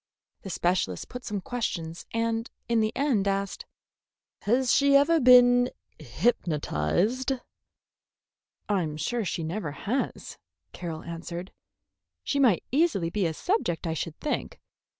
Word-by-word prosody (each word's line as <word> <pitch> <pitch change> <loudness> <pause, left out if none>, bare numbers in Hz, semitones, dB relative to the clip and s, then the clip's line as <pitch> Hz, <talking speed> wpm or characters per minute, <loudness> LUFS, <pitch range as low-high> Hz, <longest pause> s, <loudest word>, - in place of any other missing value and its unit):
The 195 - -8
specialist 175 - -1
put 250 0 -7
some 205 -3 -3
questions 170 -8 -4
and 230 0 -1 0.2
in 235 -1 +2
the 215 0 +1
end 255 -8 +1
asked: 195 0 -2 0.7
"Has 245 +3 +2
she 280 0 +5
ever 320 +4 +5
been 245 -1 +7 0.3
hypnotized?" 175 - 0 1.3
"I'm 170 -7 0
sure 230 +10 -1
she 170 -3 -3
never 165 0 -3
has," 225 - -3 0.3
Carroll 165 -3 -6
answered. 170 +2 -6 0.7
"She 280 - -1
might 240 -10 +4
easily 270 - +2
be 200 -3 +1
a 160 - -2
subject, 355 - -1
I 165 - -1
should 160 0 -5
think. 300 - -3
205 Hz, 125 wpm, -27 LUFS, 170-245 Hz, 1.3 s, been